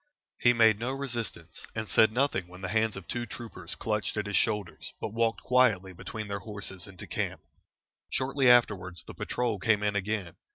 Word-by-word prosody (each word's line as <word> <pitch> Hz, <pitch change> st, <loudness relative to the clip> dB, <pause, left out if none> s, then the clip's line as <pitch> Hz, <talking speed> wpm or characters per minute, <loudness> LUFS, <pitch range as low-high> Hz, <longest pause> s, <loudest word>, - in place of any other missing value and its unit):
He 120 Hz, -, +6 dB
made 110 Hz, -3 st, +5 dB
no 125 Hz, +3 st, -1 dB
resistance, 120 Hz, -, -4 dB
and 110 Hz, -1 st, -3 dB
said 110 Hz, +1 st, +5 dB
nothing 120 Hz, -7 st, +1 dB
when 90 Hz, +1 st, -12 dB
the 95 Hz, -, -3 dB
hands 110 Hz, -1 st, +2 dB
of 95 Hz, -, -9 dB
two 120 Hz, 0 st, -3 dB
troopers 95 Hz, -7 st, -6 dB
clutched 105 Hz, -1 st, -2 dB
at 105 Hz, -, 0 dB
his 100 Hz, 0 st, -2 dB
shoulders, 105 Hz, -5 st, -1 dB
but 105 Hz, -, -4 dB
walked 115 Hz, 0 st, +1 dB
quietly 110 Hz, -7 st, +3 dB
between 105 Hz, +4 st, -6 dB
their 100 Hz, 0 st, -3 dB
horses 100 Hz, -2 st, -5 dB
into 95 Hz, -2 st, -10 dB
camp. -, -, -3 dB, 0.7 s
Shortly 135 Hz, 0 st, +2 dB
afterwards 95 Hz, -8 st, +3 dB
the -, -, -9 dB
patrol 120 Hz, -4 st, -1 dB
came 105 Hz, +2 st, +2 dB
in 105 Hz, -1 st, +1 dB
again. 100 Hz, -3 st, -2 dB
110 Hz, 180 wpm, -29 LUFS, 95-120 Hz, 0.7 s, He